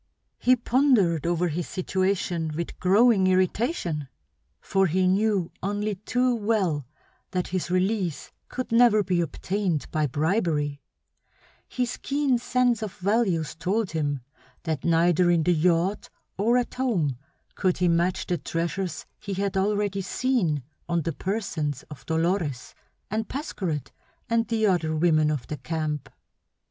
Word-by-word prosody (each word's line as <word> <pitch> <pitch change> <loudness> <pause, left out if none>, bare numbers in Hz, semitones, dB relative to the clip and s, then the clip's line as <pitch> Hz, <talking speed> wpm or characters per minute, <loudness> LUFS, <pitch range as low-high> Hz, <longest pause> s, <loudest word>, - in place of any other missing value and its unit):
He 255 +1 +5
pondered 235 - +2
over 175 0 +1
his 165 +2 -3
situation 185 -3 -1
with 170 +1 -5
growing 200 +1 +4
irritation; 185 - 0 0.5
for 195 -1 +1
he 185 +3 +2
knew 195 -2 +1
only 205 +2 -1
too 245 +6 0
well 200 - 0 0.4
that 180 -1 -2
his 185 -1 -2
release 185 -2 0 0.2
could 255 -2 -4
never 230 -3 +5
be 180 -2 +1
obtained 175 +1 -1
by 155 -1 +1
bribery; 150 - 0 0.9
his 250 -1 -2
keen 275 -3 +1
sense 245 -2 +1
of 210 -3 -4
values 190 -6 +1
told 190 +5 -1
him 145 -4 -1 0.4
that 160 -5 -2
neither 170 +1 +3
in 170 -2 +3
the 180 - +3
yacht 175 +4 +1 0.3
or 230 +5 +3
at 245 - -1
home 185 - 0 0.4
could 185 -2 0
he 180 - +2
match 175 +2 +1
the 175 -3 -1
treasures 170 +4 -3
he 200 -2 -5
had 195 0 -1
already 200 0 +1
seen 185 - 0 0.3
on 170 -2 +1
the 165 - -2
persons 160 - -3
of 150 - -11
Dolores, 160 -5 -1 0.4
and 220 +1 -2
Pascherette, 185 - -3 0.4
and 230 0 +1
the 225 -2 +1
other 170 -5 +1
women 155 -1 +3
of 145 -5 -2
the 150 - -5
camp. 150 +1 -3
185 Hz, 135 wpm, -26 LUFS, 165-215 Hz, 0.9 s, He